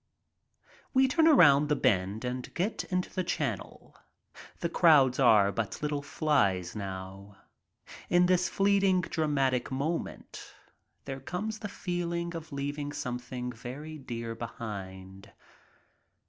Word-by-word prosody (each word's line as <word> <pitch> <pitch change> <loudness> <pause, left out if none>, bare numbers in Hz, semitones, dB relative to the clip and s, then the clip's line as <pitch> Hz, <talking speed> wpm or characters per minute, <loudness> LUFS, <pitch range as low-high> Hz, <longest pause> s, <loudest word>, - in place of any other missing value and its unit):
We 265 0 +5
turn 320 +5 +3
around 150 - +6
the 150 - +3
bend 105 -3 0
and 125 0 -4
get 195 +6 -1
into 180 -1 -2
the 185 - -1
channel. 175 - -4 0.7
The 170 - +1
crowds 140 -8 +5
are 105 -6 +5
but 105 -2 -3
little 145 -1 -1
flies 115 - 0
now. 95 0 -7 0.7
In 175 0 +5
this 180 0 +2
fleeting 195 -2 +3
dramatic 145 -7 0
moment 150 +6 -4 0.5
there 135 -1 -5
comes 210 +9 -4
the 205 - -5
feeling 170 -2 -3
of 165 -1 -7
leaving 145 +1 -3
something 125 0 -4
very 140 +7 -8
dear 115 -3 -5
behind. 95 -4 -8
140 Hz, 120 wpm, -29 LUFS, 115-170 Hz, 0.7 s, around